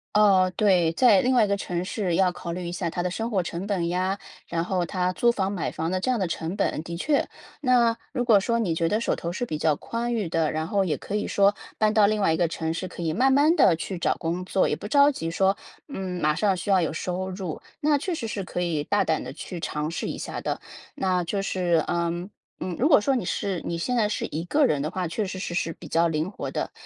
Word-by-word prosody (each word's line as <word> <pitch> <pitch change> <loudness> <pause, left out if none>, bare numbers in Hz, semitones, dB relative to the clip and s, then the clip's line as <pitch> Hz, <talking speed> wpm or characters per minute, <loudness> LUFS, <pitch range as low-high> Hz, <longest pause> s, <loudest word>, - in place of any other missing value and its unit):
哦， 195 -3 +5
对。 180 -6 +3
在 215 -2 +5
另 255 +1 +2
外 235 - +6
一 - - +2
个 200 - +1
城 175 -2 -3
市 190 -3 -1
要 185 0 +3
考 170 -1 -6
虑 180 0 -5
一 170 - -4
下 175 -1 -2
它 175 +2 -3
的 180 - -1
生 225 +4 -3
活 190 -5 +1
成 175 +4 -5
本 180 -5 0
呀， 185 +2 0 0.3
然 165 -1 -1
后 180 -1 0
它 180 -1 -1
租 235 +6 +2
房 195 -4 0
买 185 -5 -2
房 165 +2 -3
的 185 - 0
这 255 - -1
样 250 - +2
的 190 - 0
成 165 +1 -3
本， 195 -6 0
的 170 +1 -6
确。 285 - +1 0.3
那 240 -4 +3 0.2
如 245 -3 0
果 225 -4 +5
说 235 +4 0
你 190 -8 0
觉 165 0 0
得 215 +6 0
手 - - +1
头 170 - -4
是 245 - -2
比 155 - -3
较 155 -1 +2
宽 235 +9 -3
裕 210 -8 -1
的， 160 -2 +1
然 155 0 -1
后 200 -2 +2
也 155 - 0
可 200 - -5
以 210 - -1
说 200 0 +4 0.2
搬 215 0 +2
到 210 -2 +6
另 215 -1 0
外 165 - +3
一 - - 0
个 175 -2 +2
城 160 0 -3
市， 185 +2 -4
可 - - -9
以 160 - 0
慢 265 +9 +3
慢 295 +4 +5
地 190 - +6
去 170 +2 -5
找 - - +1
工 175 +2 -3
作， 190 - +2
也 - - +1
不 205 - -7
着 285 +4 +5
急， 165 -11 -4
说 195 +3 +2 0.3
嗯， 185 -8 -4
马 150 0 +3
上 195 +3 +1
需 180 +3 -5
要 190 -1 +5
有 160 -2 -1
收 185 +3 -3
入。 185 -4 -5 0.2
那 295 -1 +3
确 345 +5 -2
实 250 - -4
是 215 -3 -3
可 180 - -3
以 160 -4 -1
大 205 - +2
胆 160 - 0
地 130 - -7
去 170 +2 -7
尝 150 0 -3
试 - - -3
一 - - -4
下 - - -5
的， - - -3 0.3
那 185 -8 0
就 195 +4 -1
是， 175 -4 +1
嗯， 170 +2 -1 0.3
嗯， 180 -2 -3
如 275 - +4
果 285 -9 +6
说 265 +3 +2
你 220 - -3
是 185 0 -2
你 170 - -2
现 245 +9 -1
在 215 -2 +3
是 210 - -2
一 160 +3 -3
个 295 +10 +3
人 145 - +1
的 155 - -1
话， 180 -1 -3
确 210 +5 -2
实 185 0 -5
是 175 - -4
是 165 -2 -1
比 160 - -12
较 165 +2 +3
灵 160 +4 -1
活 - - -5
的。 - - -3
185 Hz, 290 characters per minute, -25 LUFS, 170-210 Hz, 0.3 s, 外